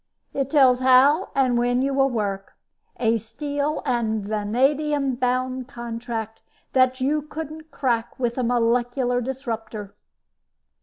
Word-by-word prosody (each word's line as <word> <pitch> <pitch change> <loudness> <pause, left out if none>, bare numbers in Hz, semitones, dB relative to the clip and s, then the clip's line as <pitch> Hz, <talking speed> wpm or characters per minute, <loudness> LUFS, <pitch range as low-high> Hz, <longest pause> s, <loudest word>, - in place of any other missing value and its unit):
"It 275 -1 -1
tells 265 -4 +5
how 260 +7 +5
and 255 -3 +3
when 245 +1 +1
you 275 0 0
will 270 0 +3
work. 200 -5 -3 0.5
A 230 -1 +2
steel 285 +7 -3
and 220 -5 -1
vanadium 270 +7 +1
bound 255 0 -1
contract 230 -3 -6 0.3
that 255 0 +3
you 295 +3 +1
couldn't 310 +1 -8
crack 240 -5 -1
with 240 -2 0
a - - +1
molecular 245 +1 +1
disruptor." 225 -5 -5
250 Hz, 120 wpm, -23 LUFS, 230-275 Hz, 0.5 s, tells